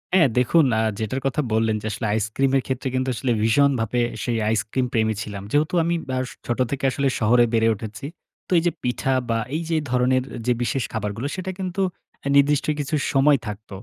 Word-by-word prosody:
হ্যাঁ, 170 -6 +6
দেখুন, 150 +6 +4
আ - - +2 0.2
যেটার 120 +5 -2
কথা 135 +3 +1
বললেন, 110 0 +2
যে - - -9
আসলে 105 - -4
আইসক্রিমের 130 +6 +1
ক্ষেত্রে 130 +1 -2
কিন্তু 130 0 0
আসলে 125 +1 -1
ভীষণভাবে 120 -1 +2 0.2
সেই 120 -2 -1
আইসক্রিম 110 +4 0
প্রেমী 110 -1 +2
ছিলাম। 100 -3 -6
যেহেতু 150 +3 +1
আমি 170 +1 +1
বআ 130 - -1 0.3
ছোট 120 +1 -1
থেকে 140 - -3
আসলে 140 +1 0
শহরে 120 +2 +4
বেড়ে 115 0 +3
উঠেছি। 110 +4 -8 0.4
তো - - -16
এই 165 - +2
যে 175 - +3
পিঠা 125 +2 0 0.2
বা 115 - +2 0.2
এই 160 - -1
যে 165 - +1 0.2
ধরনের 125 +1 +2 0.2
যে 125 - +4
বিশেষ 130 +1 -1
খাবারগুলো, 110 +4 -3
সেটা 185 0 -4
কিন্তু 185 +1 -2 0.4
আ - - 0
নির্দিষ্ট 145 0 +3
কিছু 145 +1 -1 0.2
সময় 140 +1 +5
থাকত। 105 +1 -7
130 Hz, 190 wpm, -23 LUFS, 110-140 Hz, 0.4 s, হ্যাঁ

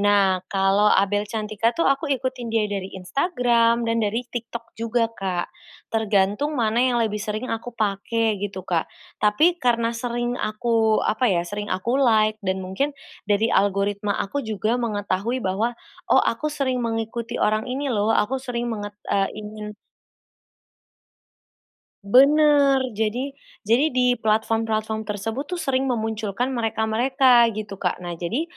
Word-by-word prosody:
Nah 200 -2 +3
kalau 195 +2 +3
Abel 205 +1 +2
Cantika 215 0 -1
tuh 335 - +1
aku 275 +3 +1
ikutin 260 -3 -2
dia 225 -1 +1
dari 200 -2 -3
Instagram 235 - +1
dan 230 0 0
dari 225 +3 -1
TikTok 235 -1 -7
juga, 230 0 0
Kak, 185 -4 -3 0.4
tergantung 220 +6 +1
mana 230 0 +1
yang 250 -1 +2
lebih 210 -1 -2
sering 215 +4 -3
aku 235 +1 -6
pakai 215 +1 0
gitu, 190 -3 -5
Kak, 170 -3 -1 0.3
tapi 315 +12 +3
karena 235 -1 +1
sering 240 +1 -3
aku, 220 0 +1
apa 240 +3 +1
ya, 175 -3 +1
sering 205 +3 -5
aku 235 +9 0
like 215 -4 +3
dan 190 -1 -2
mungkin 275 +10 -2 0.3
dari 210 +3 +2
algoritma 200 +1 +1
aku 285 +9 -2
juga 220 +1 -1
mengetahui 215 +2 -2
bahwa, 215 +6 -1 0.3
oh - - +5
aku 300 +7 -1
sering 270 -4 -1
mengikuti 230 +1 -3
orang 215 +3 +1
ini 270 +1 -2
loh, 210 -1 +1
aku 240 +4 +1
sering 240 -2 -3
menget 205 -1 -6
eee, 195 -1 +1
ingin 210 0 -7 2.3
Benar. 280 +4 +5
Jadi 225 +6 -2 0.3
jadi 235 +8 +3
di 250 -2 +1
platform-platform 220 0 0
tersebut 225 +7 -4
tuh 360 - -3
sering 270 -5 0
memunculkan 225 +1 -2
mereka-mereka 235 +2 +3
gitu, 210 -2 -6
Kak. 180 - 0
Nah 175 - -4
jadi 225 - -1
225 Hz, 140 wpm, -23 LUFS, 205-245 Hz, 2.3 s, oh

